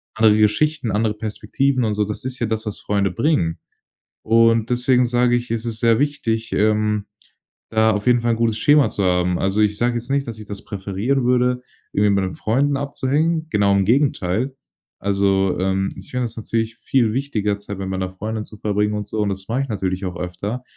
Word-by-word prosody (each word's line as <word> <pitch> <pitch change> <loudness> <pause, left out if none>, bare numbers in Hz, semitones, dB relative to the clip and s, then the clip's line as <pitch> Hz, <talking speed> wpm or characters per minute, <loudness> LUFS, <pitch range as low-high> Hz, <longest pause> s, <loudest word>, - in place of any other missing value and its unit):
andere 110 -1 +5
Geschichten, 125 +6 +2
andere 105 +1 +1
Perspektiven 115 +5 -1
und 110 -2 0
so“. 105 0 0
Das 105 +4 -6
ist 130 -1 -4
ja 120 - 0
das, 110 0 -2
was 105 - -5
Freunde 100 -1 0
bringen. 105 - 0 0.6
Und 115 0 +3
deswegen 125 0 +3
sage 120 0 +2
ich: 120 -1 -3
„Es 115 0 -2
ist 115 -2 -4
sehr 115 +1 +3
wichtig, 115 -6 -1
ähm, 105 0 +1 0.7
da 110 0 +3
auf 105 +2 -2
jeden 120 -1 +4
Fall 120 - +1
'n - - 0
gutes 115 -2 +1
Schema 145 +4 +4
zu 100 - -2
haben“. 90 -1 +2
Also 95 +2 +1
ich 105 -1 +2
sag 120 +2 +1
jetzt 120 +2 -5
nicht, 140 0 +1
dass 115 -2 -6
ich 105 - -10
das 100 -1 -7
präferieren 100 +7 -2
würde, 125 0 +2 0.3
irgendwie 105 0 +3
mit 100 -1 +2
meinen 95 - -3
Freunden 140 +6 +1
abzuhängen. 150 +4 0
Genau, 100 -6 +2
im 100 -1 +2
Gegenteil. 125 -1 +1 0.4
Also, 100 -1 +1
ähm, 95 +1 0
ich 95 - -12
finde 125 -1 -1
das 115 -1 -7
natürlich 115 +1 -2
viel 120 -5 +1
wichtiger 105 -7 -1
Zeit 100 -1 -7
mit 95 0 -4
meiner 95 -1 -2
Freundin 105 +3 -5
zu 105 - -13
verbringen 105 0 0
und 105 0 -3
so 110 - -4
und 105 - +1
das 95 0 -5
mach 120 +4 -1
ich 135 - -1
natürlich 95 -2 -2
auch 90 0 -4
öfter. 100 +7 -4
110 Hz, 210 wpm, -21 LUFS, 100-125 Hz, 0.7 s, andere